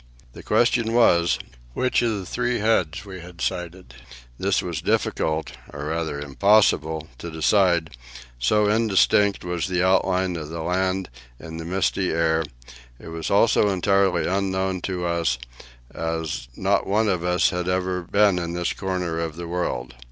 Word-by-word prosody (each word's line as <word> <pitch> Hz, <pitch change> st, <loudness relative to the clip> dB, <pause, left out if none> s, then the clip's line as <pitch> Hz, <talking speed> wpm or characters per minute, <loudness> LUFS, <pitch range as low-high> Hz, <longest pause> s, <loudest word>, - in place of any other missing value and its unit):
The -, -, -10 dB
question 115 Hz, -1 st, +2 dB
was, 85 Hz, -9 st, +4 dB, 0.4 s
which 130 Hz, -, +1 dB
of 115 Hz, -3 st, 0 dB
the 95 Hz, -, -6 dB
three 125 Hz, +5 st, -1 dB
heads 105 Hz, -5 st, 0 dB
we 95 Hz, -2 st, -8 dB
had 85 Hz, 0 st, -12 dB
sighted. 90 Hz, -5 st, -4 dB, 0.5 s
This -, -, +1 dB
was -, -, -4 dB
difficult, 80 Hz, 0 st, 0 dB, 0.2 s
or 70 Hz, 0 st, -6 dB
rather 80 Hz, -3 st, -2 dB
impossible, 80 Hz, 0 st, +2 dB
to 85 Hz, -, -6 dB
decide, 85 Hz, -2 st, +2 dB, 0.4 s
so 105 Hz, -, +2 dB
indistinct 105 Hz, -2 st, +3 dB
was 90 Hz, 0 st, -2 dB
the 90 Hz, -1 st, 0 dB
outline 95 Hz, -1 st, +2 dB
of 75 Hz, -2 st, -6 dB
the 80 Hz, 0 st, -5 dB
land 95 Hz, 0 st, -1 dB, 0.3 s
in 80 Hz, 0 st, -8 dB
the 80 Hz, -, -6 dB
misty 95 Hz, +1 st, 0 dB
air; 80 Hz, 0 st, +1 dB, 0.6 s
it -, -, -10 dB
was 80 Hz, 0 st, -4 dB
also 105 Hz, +1 st, +4 dB
entirely 95 Hz, -3 st, +2 dB
unknown 95 Hz, -1 st, -1 dB
to 90 Hz, -2 st, -3 dB
us, 85 Hz, -7 st, 0 dB, 0.6 s
as 80 Hz, -6 st, -3 dB
not -, -, +1 dB
one 105 Hz, +3 st, +2 dB
of 90 Hz, -4 st, 0 dB
us 90 Hz, -1 st, +2 dB
had 90 Hz, 0 st, -2 dB
ever 90 Hz, 0 st, -1 dB
before 100 Hz, +4 st, +3 dB
been 90 Hz, -, -1 dB
in 85 Hz, -1 st, -4 dB
this 85 Hz, 0 st, -1 dB
corner 90 Hz, -4 st, -3 dB
of 80 Hz, -2 st, -3 dB
the 85 Hz, 0 st, -6 dB
world. 85 Hz, -8 st, -3 dB
90 Hz, 160 wpm, -23 LUFS, 80-95 Hz, 0.6 s, was